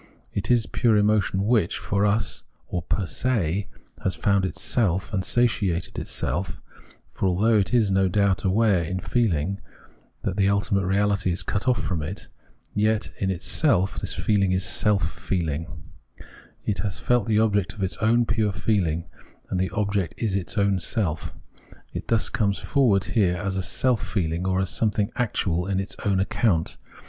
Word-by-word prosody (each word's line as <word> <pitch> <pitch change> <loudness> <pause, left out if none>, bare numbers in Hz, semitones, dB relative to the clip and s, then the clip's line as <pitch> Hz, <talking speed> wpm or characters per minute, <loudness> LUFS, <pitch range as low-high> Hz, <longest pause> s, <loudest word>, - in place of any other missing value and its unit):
It 100 - -3
is 120 -3 +4
pure 115 -4 +2
emotion 105 -2 +2
which, 110 -6 +2
for 100 +1 0
us 100 -1 -1 0.2
or 90 - -3
per 95 +3 -1
se 100 -1 -1 0.4
has 95 - 0
found 100 +2 +2
itself 95 +1 0
and 95 -2 0
satiated 100 -6 +1
itself, 90 +2 -2 0.5
for - - -1
although 105 +5 +3
it 95 - -1
is, 115 -5 +3
no 95 0 +3
doubt, 100 0 +1
aware 100 -1 +3
in 90 +3 -3
feehng 100 -5 0 0.7
that 95 - -2
the 100 -1 +3
ultimate 100 -1 +1
reahty 100 -1 +1
is 85 - -2
cut 100 - -2
off 125 - +2
from 85 -5 -2
it, 90 +8 -6 0.4
yet 110 +1 +1
in 95 - 0
itself 95 - +2
this - - -3
feehng 100 -3 +1
is 95 0 0
self 105 -3 +2
feeling; 80 -3 -2 1.0
it 105 - -1
has 100 -4 -2
felt 120 -2 +1
the 110 -2 +2
object 100 -3 +1
of 100 - -5
its 95 - -2
own 115 +2 +3
pure 110 -2 +1
feehng, 90 -5 0 0.5
and 90 - 0
this 95 0 0
object 100 -3 -1
is 105 -5 -1
its 100 +2 -3
own 100 -2 +2
self. 85 -3 -1 0.6
It - - -5
thus 115 -1 +2
com.es 100 -3 0
forward 115 -9 +2
here 95 -6 +1
as 95 +1 -2
self 125 +4 +1
feehng, 85 -2 -2
or 95 0 +1
as 95 -2 0
something 105 -2 +1
actual 95 -6 0
on 95 -1 0
its 95 +2 -4
own 100 -2 +1
account. 95 -3 0
100 Hz, 165 wpm, -24 LUFS, 95-110 Hz, 1.0 s, is